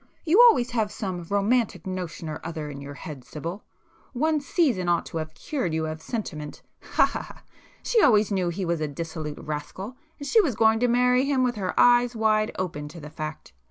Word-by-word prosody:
"You 355 +8 +6
always 245 - +1
have 220 -3 0
some 180 -4 -5
romantic 200 -2 +1
notion 180 -3 -5
or 155 -1 -5
other 160 -3 -5
in 140 -1 -8
your 140 0 -8
head 145 -5 -8
Sibyl,—one 205 - -4
'season' 260 - +1
ought 170 -1 +2
to - - -6
have 155 0 -5
cured 185 - -2
you 160 0 0
of 155 0 -5
sentiment—ha 155 - -2
ha - - -4
ha! - - -13 0.4
She 465 -3 +3
always 215 - +4
knew 185 -3 +1
he 180 +2 -3
was 170 -2 -1
a 155 - 0
dissolute 155 0 -5
rascal, 155 - -6 0.2
and 285 - -7
she 445 - +5
was 280 - -1
going 220 +1 +4
to 245 - +3
marry 250 +2 +3
him 275 -2 +2
with 250 -1 +1
her 195 -5 -3
eyes 245 0 +5
wide 215 -1 +2
open 160 -5 -3
to 165 +3 -10
the 150 -1 -9
fact. 155 - -7
185 Hz, 195 wpm, -26 LUFS, 155-245 Hz, 0.4 s, You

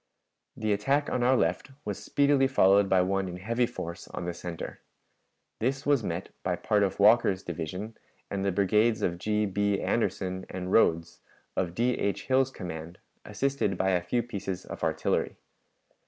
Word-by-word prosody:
The 110 -1 +1
attack 135 +9 +1
on 125 - 0
our 130 +2 +4
left 90 +10 0 0.2
was - - -4
speedily 140 -1 +3
followed 100 -6 +4
by 95 -1 +4
one 95 +1 0
in 90 0 -6
heavy 115 +6 0
force 85 -8 -7
on 90 - -6
the 85 - -2
center. 85 -1 -7 0.8
This 135 +4 -1
was 145 -5 +3
met 85 +1 -3
by 90 -1 0
part 105 +4 +1
of 100 0 0
Walker's 100 -2 +5
division 90 +6 -5 0.3
and 100 -1 -3
the 100 - +1
brigades 105 +4 +2
of 85 -1 -1
G. 105 +2 +1
B. 100 0 0
Anderson 95 -5 -1
and 90 0 -5
Rodes, 85 -7 +2 0.4
of 90 -2 -1
D. 125 +2 +2
H. 100 - -1
Hill's 130 0 +3
command, 85 -6 -7 0.3
assisted 135 -7 -1
by 95 0 +2
a 90 -1 +2
few 115 +8 -1
pieces 100 -5 -5
of - - -8
artillery. - - 0
100 Hz, 170 wpm, -28 LUFS, 90-120 Hz, 0.8 s, Walker's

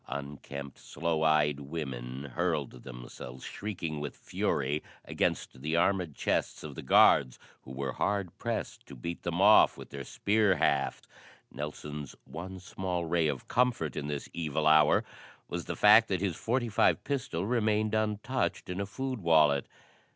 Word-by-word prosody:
Unkempt, 70 0 -7
sloe 80 -1 -2
eyed 75 -2 +3
women 70 -3 -6
hurled 65 - -1
themselves, 60 0 -9
shrieking 85 -7 -4
with 75 0 -5
fury, 70 +2 -1 0.2
against 65 - -2
the 80 +3 -1
armored 85 -3 +1
chests - - -1
of - - -7
the - - -7
guards, 65 - +5 0.2
who 65 - -12
were 65 0 -3
hard 100 +2 -1
pressed - - -3
to - - -10
beat 85 +7 -5
them 85 +1 -2
off 105 +2 +6
with - - -11
their 70 -1 -6
spear 105 +6 +2
hafts. 70 -5 0 0.4
Nelson's 75 -1 -6
one 95 +3 -7
small 90 -2 -3
ray 85 -1 +2
of 70 -4 -3
comfort 125 -1 +1
in 70 - -3
this 75 -1 -4
evil 80 -2 -2
hour 75 -1 +5 0.4
was - - -4
the - - -4
fact 105 +2 +7
that 95 -3 0
his 95 -2 0
.45 120 0 +1
pistol 120 - -2
remained 110 -2 +1
untouched 110 +1 -1
in 90 +2 -3
a 100 - -3
food 130 +2 -4
wallet. 75 -4 +4
80 Hz, 150 wpm, -30 LUFS, 70-100 Hz, 0.4 s, fact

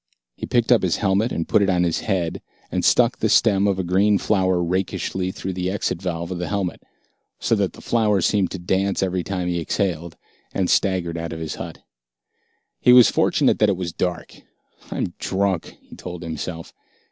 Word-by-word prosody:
He - - -6
picked 120 0 +1
up 120 - +6
his 90 -3 +1
helmet 100 +4 +1
and 85 - -2
put - - +3
it 100 - +2
on 90 -2 +2
his 85 -2 0
head, 90 -6 -2 0.3
and - - -1
stuck - - +3
the - - +1
stem 100 0 +4
of 100 -2 +1
a 95 - -1
green 100 +4 +3
flower 95 -3 +1
rakishly 95 +1 -2
through 95 0 -5
the 90 0 -2
exit 95 -2 -2
valve 85 -1 -3
of 90 - -4
the 90 - -3
helmet, 100 -4 -2 0.6
so - - 0
that - - +1
the - - -13
flower 110 -4 +2
seemed 95 +1 +1
to - - -5
dance 95 +2 0
every 90 -1 -1
time 90 0 -3
he 85 -1 -1
exhaled, 85 -2 -2 0.4
and 95 -2 +1
staggered 90 -4 +1
out 85 0 -5
of 80 - -6
his 80 -1 -4
hut. - - -8 1.0
He 125 - +5
was 125 -3 +8
fortunate - - +2
that 105 - +4
it 95 - 0
was 85 -2 -4
dark. 90 -1 -4 0.5
"I'm 85 - -3
drunk," 95 -3 -1
he - - -14
told 90 -1 -8
himself. 85 0 -6
95 Hz, 195 wpm, -22 LUFS, 85-100 Hz, 1.0 s, was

